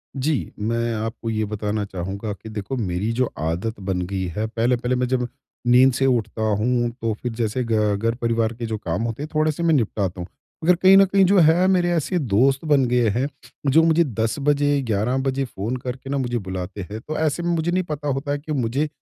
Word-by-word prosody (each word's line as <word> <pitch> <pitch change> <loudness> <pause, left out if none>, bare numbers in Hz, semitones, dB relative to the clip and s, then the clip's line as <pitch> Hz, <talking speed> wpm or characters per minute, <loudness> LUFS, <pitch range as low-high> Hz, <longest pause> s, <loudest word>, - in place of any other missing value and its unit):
जी, 140 +1 -1
मैं 115 +2 -1
आपको 115 +1 -4
ये 110 -1 0
बताना 105 0 -2
चाहूँगा 100 +3 -5
कि 110 +3 -11
देखो 105 +4 -4
मेरी 100 +1 -1
जो 130 - +4
आदत 85 +8 -2
बन 95 -2 -2
गई 95 -1 -2
है। 110 +1 -1
पहले-पहले 120 +2 0
मैं 125 0 0
जब 125 -1 0 0.4
नींद 125 +1 +6
से 135 - +1
उठता 115 -4 0 0.2
हूँ 120 +1 +1
तो 115 -1 0
फिर 125 - -2
जैसे 115 +2 -1
घ 110 -3 +1
घर 115 +3 0
परिवार 115 -1 +1
के 115 0 -5
जो 110 -1 -3
काम 90 +2 -3
होते 115 +5 -3
हैं 155 - -6
थोड़े-से 155 +1 +1
मैं 165 -1 +3
निपटाता 100 - 0
हूँ। 85 - -6 0.4
अगर 180 +2 +5
कहीं 190 +2 +6
न 195 - +7
कहीं 195 +1 +3
जो 195 +2 +4
है, 165 +3 +5
मेरे 180 -2 +3
ऐसे 175 +2 0
दोस्त 135 +4 +2
बन 145 -3 +4
गए 120 -1 +2
हैं 125 +7 0 0.4
जो 160 +3 +6
मुझे 165 +1 +4
10 115 -5 -1
बजे, 145 0 +2
11 115 +2 0
बजे 135 0 -1
फ़ोन 115 +1 -4
करके 130 +2 -6
ना 140 - 0
मुझे 120 -2 -1
बुलाते 95 0 -5
हैं, 110 - -4
तो 155 +6 -5
ऐसे 160 +2 0
में 175 - 0
मुझे 165 +2 0
नहीं 185 +1 +1
पता 150 -3 -5
होता 140 +1 -1
है 145 - 0
कि 155 +2 -8
मुझे 135 +2 0
120 Hz, 220 wpm, -22 LUFS, 110-145 Hz, 0.4 s, न